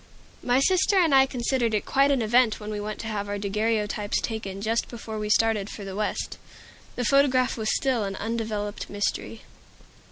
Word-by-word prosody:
My 250 +1 +2
sister 375 +6 +3
and 335 -6 +4
I 270 0 +6
considered 240 -2 0
it 210 - -1
quite 275 +1 +3
an 270 -4 +2
event 235 0 +3
when 210 0 -6
we 210 - -3
went 210 +1 -5
to 225 - -6
have 205 -2 -3
our 205 - -2
daguerreotypes 210 0 -1
taken 205 -4 -4
just 225 +3 0
before 225 -2 -7
we 210 0 -3
started 215 -2 +2
for 205 - -8
the 190 -1 -6
West. 210 0 -3 0.6
The 245 - -2
photograph 265 -1 +3
was 220 -3 -2
still 255 -5 +1
an 195 -1 -3
undeveloped 215 -1 -3
mystery. 205 +2 -3
220 Hz, 185 wpm, -26 LUFS, 210-250 Hz, 0.6 s, I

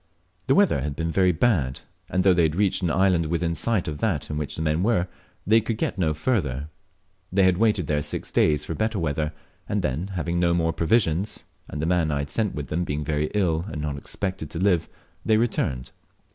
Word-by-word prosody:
The - - +4
weather 70 - +4
had 70 +1 -3
been 80 +1 -2
very 95 +1 +3
bad, 80 - +1 0.3
and 95 - +1
though 95 -1 +6
they 90 - +3
had 80 -1 +2
reached 100 0 +2
an 90 - +1
island 90 -2 +2
within 85 +1 0
sight 95 +4 0
of 75 -1 -4
that 85 -12 -1
in 75 - -2
which 75 -2 -3
the 80 - -3
men 80 +1 +1
were, 95 -4 +2 0.4
they 110 +3 +5
could 110 0 -3
get 105 - -2
no 80 -4 +1
further. 75 - -1 0.6
They 95 +1 +3
had 95 -1 +3
waited 105 -6 +2
there 75 0 0
six 75 - -4
days 75 -1 +2
for - - -3
better 110 +5 -1
weather, 75 -3 -1 0.4
and - - 0
then, 75 +8 -1
having 85 0 -1
no 85 -1 +3
more 80 -1 +1
provisions, 85 +2 +1 0.2
and 75 - -6
the 80 - -1
man 85 -2 +2
I 75 - 0
had 70 0 -4
sent 110 -4 -1
with 75 - -4
them 85 +3 0
being 75 -2 -3
very 75 +1 0
ill 85 -5 +1
and 80 - -5
not 75 -1 -2
expected 85 +2 -4
to - - -7
live, 90 -4 +2 0.3
they 110 - +3
returned. 70 - -1
85 Hz, 220 wpm, -25 LUFS, 75-95 Hz, 0.6 s, though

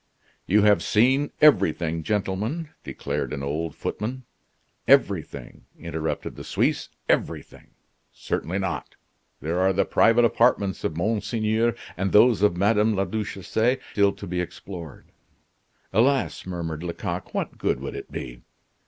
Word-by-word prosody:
"You 105 +2 +4
have 105 -1 +5
seen 130 +6 +3
everything, 85 - +4
gentlemen," 105 - -2
declared - - -4
an 70 - -4
old 75 +3 -3
footman. 125 +4 -4 0.6
"Everything!" - - +1
interrupted 80 -1 -4
the - - -8
Suisse, - - 0 0.2
"everything! - - -2 0.4
Certainly 90 +4 -3
not. 90 -9 -4 0.5
There 80 +5 -1
are 95 +1 +3
the 95 - +1
private 115 +1 +4
apartments 110 -5 +2
of 80 - -2
Monseigneur 110 +3 0 0.2
and 95 +2 -1
those 115 0 +5
of 105 -4 +3
Madame 105 +2 +3
la 95 0 +1
Duchesse 110 +4 -1
still 100 -1 +3
to 100 0 -9
be 90 -1 -2
explored." 90 -3 -9 0.8
"Alas!" 130 0 +2
murmured 80 -3 -4
Lecoq, 85 -1 -4
"What - - -3
good - - 0
would - - -6
it - - -8
be?" - - -7
100 Hz, 130 wpm, -25 LUFS, 85-110 Hz, 0.8 s, have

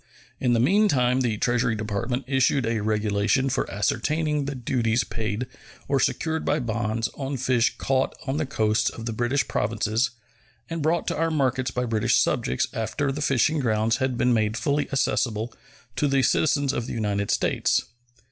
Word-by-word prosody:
In 125 -2 +2
the 115 - +3
meantime 130 - +3
the 115 -4 0
Treasury 120 0 +1
Department 110 +4 -2
issued 135 0 +2
a 115 -1 0
regulation 105 +4 +1
for - - -1
ascertaining 150 +8 0
the 140 0 -4
duties 120 -1 0
paid 110 +1 -3 0.4
or 140 - +2
secured 160 +4 0
by 150 - +1
bonds 115 -1 -1
on 135 0 -4
fish 125 -1 +1
caught 135 0 0
on 135 +1 -1
the 155 -2 -1
coasts 110 -4 +1
of 115 - -8
the 115 - -2
British 120 +5 0
Provinces 110 +3 0 0.6
and 165 -1 -4
brought 160 +3 +1
to - - -2
our 165 +1 +1
markets 130 -4 0
by 125 0 -2
British 110 -3 +1
subjects 65 +1 +1
after 115 +5 -1
the 145 +2 -4
fishing 145 +2 +2
grounds 110 -2 +1
had 130 -1 -1
been 125 0 +3
made 110 -1 +1
fully 140 +6 0
accessible 120 -4 0 0.4
to 150 - +2
the 135 -1 +2
citizens 145 -2 +2
of 120 - -3
the - - -5
United 100 -3 -1
States. - - +1
125 Hz, 170 wpm, -25 LUFS, 110-135 Hz, 0.6 s, the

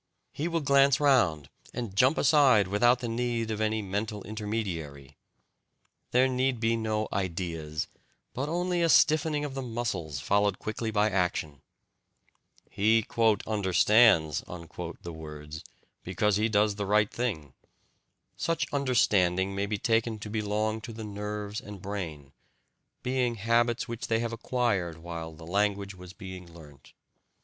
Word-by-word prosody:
He 155 - -3
will 165 -1 -1
glance 140 -1 +4
round 115 - +3 0.3
and 115 -6 -4
jump 130 +8 +4
aside 135 - +5
without 120 +6 +3
the 120 - -3
need 115 -1 -1
of 110 0 -3
any 110 0 0
"mental" 105 +2 -3
intermediary. 90 -10 -5 0.9
There 125 +2 +4
need 130 -1 0
be 115 0 +2
no 110 -1 -1
"ideas," 85 -5 -3 0.5
but 140 +4 -3
only 175 +1 0
a 165 - +3
stiffening 155 -1 +4
of 140 - -5
the 135 - -4
muscles, 105 - -3
followed 100 +5 +1
quickly 110 +1 -4
by 105 0 +2
action. 85 -6 -1 1.1
He 110 +2 +2 0.4
"understands" 100 - +4
the 85 0 -8
words, 75 -1 -8 0.4
because 105 -2 +1
he 110 +2 +1
does 105 -1 +2
the 100 -1 -3
right 105 0 +3
thing. 85 - -3 0.8
Such 165 -2 -1
"understanding" 100 -9 +2
may 100 +1 -1
be 105 0 -1
taken 115 +1 +1
to 105 0 -8
belong 110 +1 -1
to 115 0 -8
the 110 0 -7
nerves 105 0 -5
and 105 -1 -9
brain, 85 -8 -6 0.7
being 125 -2 0
habits 115 +2 +1
which 115 0 -5
they 115 - +2
have 115 0 -2
acquired 115 -8 -1
while 85 -1 -6
the 80 +1 -12
language 100 +2 0
was 90 -1 -12
being 95 -2 -9
learnt. 75 -5 -15
105 Hz, 140 wpm, -28 LUFS, 90-120 Hz, 1.1 s, aside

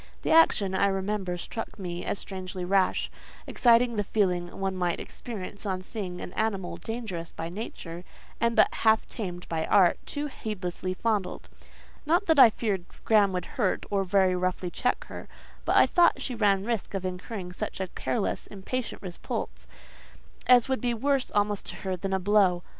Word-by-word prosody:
The - - 0
action, 210 -12 +5
I 195 +1 +3
remember, 195 -1 -1
struck 225 +5 -6
me 175 -3 -5
as - - -1
strangely 185 -2 -5
rash; 190 0 +1 0.3
exciting 235 -1 +4
the 205 - +1
feeling 180 -4 +1
one 195 -1 -1
might 180 -2 0
experience 205 -4 -7
on 190 -3 -2
seeing 185 -4 -5
an 180 - -7
animal 200 -5 -1
dangerous 220 -8 -5
by 165 +1 -5
nature, 175 -3 -7 0.4
and 235 0 +1
but - - +5
half 220 -1 +3
tamed 180 -6 -6
by 160 -1 -1
art, 185 -4 +5
too 290 0 -3
heedlessly 185 -8 -4
fondled. 205 -4 -2 0.5
Not 345 +6 +2
that 320 -5 +4
I 250 -3 +10
feared 205 -5 -2 0.2
Graham 210 -3 +5
would 180 -1 -2
hurt, 205 -7 -1
or 200 -1 +2
very 190 -1 +3
roughly 180 0 -1
check 250 +6 0
her; - - -9 0.4
but - - +2
I - - +8
thought 345 -6 +4
she 265 -1 -3
ran 200 -4 +2
risk 230 -3 -2
of 190 -1 -3
incurring 185 0 -5
such - - -4
a 190 - 0
careless, 220 +2 -2
impatient 220 +5 -5
repulse, 60 - -5 0.8
as 250 0 +6
would 265 -1 -1
be 240 -2 0
worse 275 +2 +1
almost 205 0 0
to - - -5
her 190 -1 -3
than 190 +2 -4
a 190 - +1
blow. 190 -2 +3
195 Hz, 175 wpm, -27 LUFS, 180-225 Hz, 0.8 s, I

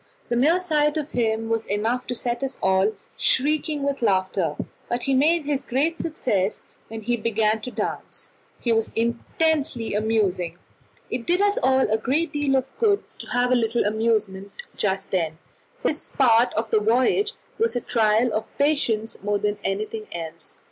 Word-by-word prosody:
The 240 - +1
mere 305 +9 +4
sight 300 -4 +1
of 305 -1 -3
him 225 -2 0
was 225 0 0
enough 225 +5 -1
to 245 - -2
set 240 0 -2
us 270 - -2
all 190 +3 +3 0.2
shrieking 295 +1 +1
with 280 -2 -1
laughter, 185 -6 +1 0.3
but 240 0 -1
he 275 - +1
made 305 +4 +3
his 285 -2 0
great 285 +6 0
success 215 - -1 0.2
when 225 0 -7
he 240 +3 0
began 220 -1 +1
to 250 - -4
dance. - - -4 0.3
He 235 - 0
was 225 -1 +1
intensely 235 +2 0
amusing. 200 -5 0 0.5
It 240 -1 -3
did 355 +1 +3
us 410 0 +3
a 260 -5 +3
great 300 +9 0
deal 290 -2 +1
of 260 -1 +2
good 415 -3 +3 0.2
to - - -6
have 245 0 +1
a - - +5
little 235 -1 +1
amusement 215 -3 0 0.2
just 195 -1 -1
then, 165 -4 0 0.5
for - - +3
this 305 - -4
part 240 -3 +4
of 220 0 -2
the 220 - +4
voyage 255 - +2 0.3
was 455 - +1
a - - +2
trial 225 0 +2
of 215 - -1
patience 240 -7 0
more 205 0 0
than 205 0 -1
anything 215 +2 -3
else. 165 -2 -7
230 Hz, 170 wpm, -24 LUFS, 215-275 Hz, 0.5 s, a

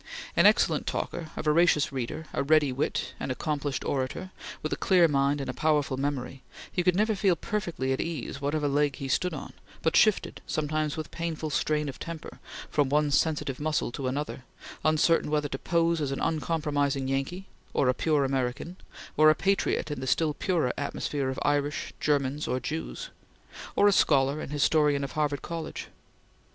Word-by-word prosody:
An - - +7
excellent - - +3
talker, 165 -2 -3
a - - -3
voracious 155 -1 +3
reader, 135 +4 -4
a - - 0
ready 150 -1 +4
wit, 135 +4 -2
an - - -4
accomplished 145 +1 -2
orator, 135 +8 -2 0.3
with 155 - -1
a - - +1
clear 180 -3 +4
mind 140 -1 +1
and 135 - -4
a 130 - -3
powerful 150 -3 +1
memory, 135 -1 -3 0.3
he 180 - 0
could 180 0 +3
never 215 +3 +2
feel 190 -3 +2
perfectly 170 -8 -2
at 130 - -1
ease 150 -4 -4
whatever 145 +1 0
leg 145 0 +1
he 135 - -5
stood 180 +7 +1
on, 145 - -8 0.3
but 160 - +1
shifted, 215 -2 +3
sometimes 155 0 -1
with 155 - -5
painful 160 -2 -3
strain 150 +1 0
of 135 - -6
temper, 165 -2 -7 0.3
from 145 -3 +2
one 150 +1 +2
sensitive 145 -3 +1
muscle 150 -4 0
to 130 +1 -4
another, 135 0 -3 0.4
uncertain 155 +1 +3
whether 150 -1 0
to 135 - -4
pose 170 -1 +1
as 140 -2 -1
an 135 - -3
uncompromising 145 -3 0
Yankee; 135 +8 -2 0.3
or 135 - +1
a 125 - +4
pure 150 0 +1
American; 135 +6 -2 0.4
or 155 +1 +7
a 155 - +5
patriot 195 -3 0
in 145 - -3
the 130 - -5
still 150 +4 +2
purer 160 -7 0
atmosphere 140 -1 -2
of 130 - -4
Irish, 145 +2 0
Germans, 145 0 0
or 130 - 0
Jews; 155 +6 -5 0.6
or 205 - +5
a - - +6
scholar 140 -5 +3
and - - -6
historian 150 -1 +2
of 140 - -4
Harvard 145 -2 -1
College. 165 -2 -5
150 Hz, 180 wpm, -28 LUFS, 140-160 Hz, 0.6 s, An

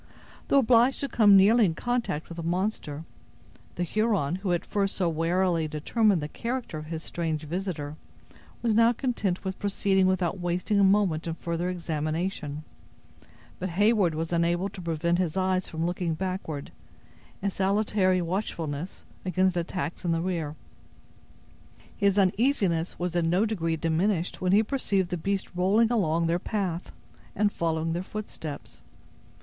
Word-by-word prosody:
Though - - +4
obliged 250 0 +4
to 280 - 0
come 205 -6 +6
nearly 220 +5 +6
in 170 -5 +2
contact 240 -11 -2
with 170 - -9
the - - -3
monster, 170 -3 -2 0.7
the 175 - -1
Huron, 195 -4 0
who 190 0 -4
had 175 -1 +1
at - - -21
first 200 -1 0
so 180 - +1
warily 165 0 +1
determined 175 +4 +1
the - - -2
character 235 -3 -4
of 155 - -9
his 160 0 -5
strange 160 -3 -3
visitor, 155 -3 -4 0.7
was 230 -2 +2
now 230 +2 +5
content 225 -8 -1
with 190 -1 -4
proceeding 195 -1 +2
without 185 0 0
wasting 180 +4 0
a - - +5
moment 190 -5 +3
in 165 - -2
further 170 +1 -2
examination; 155 -2 -3 1.0
but 185 - -2
Heyward 200 -2 +3
was 165 +2 -3
unable 170 +3 +1
to 190 - -9
prevent 170 +1 0
his 180 -1 -1
eyes 185 0 0
from 160 +1 -2
looking 175 -2 -1
backward, 185 -5 -4 0.7
in 200 +1 -1
salutary 190 -1 +1
watchfulness 170 -3 -4 0.2
against 185 0 +1
attacks 170 -2 -3
in 175 - 0
the 165 - 0
rear. 165 -5 -2 1.4
His 200 -1 +2
uneasiness 190 -4 +2
was 175 0 -3
in 165 -1 +2
no 185 +6 +3
degree 165 -7 -1
diminished 165 +3 0
when 180 -1 +1
he 210 +3 +5
perceived 200 -7 0
the 180 - -2
beast 195 +2 -2
rolling 205 +6 +3
along 170 -7 +2
their 170 +1 +1
path, 185 -4 -3 0.4
and 205 0 +2
following 165 -1 -1
their 175 - -1
footsteps. 185 -7 -7
180 Hz, 155 wpm, -27 LUFS, 165-200 Hz, 1.4 s, come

